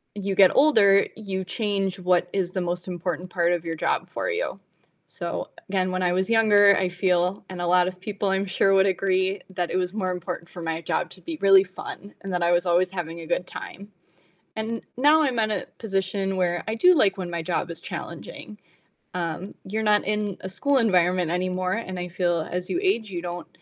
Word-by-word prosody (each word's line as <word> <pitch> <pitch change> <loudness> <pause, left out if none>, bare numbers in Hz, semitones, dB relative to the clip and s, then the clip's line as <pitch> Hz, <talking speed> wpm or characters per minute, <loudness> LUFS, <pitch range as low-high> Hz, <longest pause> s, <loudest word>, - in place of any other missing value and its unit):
you 200 -1 -2
get 190 -1 +6
older, 210 -10 +5
you 190 -3 -4
change 195 -2 -2
what 180 -1 +2
is 185 -2 -1
the 185 - -2
most 175 +1 -3
important 180 0 -4
part 175 -1 +1
of 170 -1 -1
your 165 - -3
job 155 - -1
for - - -3
you. 475 +3 -2 0.5
So, - - -5 0.2
again, 185 -1 0
when 185 0 -2
I 180 -1 +2
was 185 +2 0
younger, 205 -3 +6
I 185 - +1
feel 180 +1 0
and 185 -1 -7
a 175 - -1
lot 180 +1 +4
of 185 0 -12
people 200 0 -3
I'm 195 +1 +1
sure 195 0 +2
would 190 0 +5
agree, 190 0 +1
that 180 -2 -2
it - - -3
was 185 +1 -1
more 185 -4 -1
important 175 -1 -5
for 175 - -9
my 165 0 -2
job - - -2
to - - -15
be 330 -2 -6
really 195 -1 +7
fun 195 +2 -9
and 195 -1 -6
that 180 - -1
I 170 - +3
was 175 +1 +2
always 180 +1 +3
having 170 -3 -5
a 165 - -9
good 175 +1 0
time. 200 +2 -9 0.7
And 225 +1 -3 0.2
now 300 +4 +5
I'm 260 -5 0
at 215 -1 +1
a 210 - -2
position 195 -2 -1
where 175 -2 0
I 220 - 0
do 360 +10 +6
like 205 - +3
when 180 -2 -5
my 170 -1 -3
job 170 +1 -2
is 170 - -7
challenging, 210 -1 -8 0.6
um, 175 +2 -4
you're 215 +3 -3
not 210 -1 +3
in 210 -2 -1
a 190 - -5
school 280 +8 +1
environment 180 -5 +2
anymore, 185 +1 -1
and 185 -5 -4
I 180 - -3
feel 175 -1 0
as 180 0 -3
you 350 - -1
age 235 - 0
you 175 -1 -4
don't 175 0 -6
185 Hz, 215 wpm, -25 LUFS, 180-205 Hz, 0.7 s, really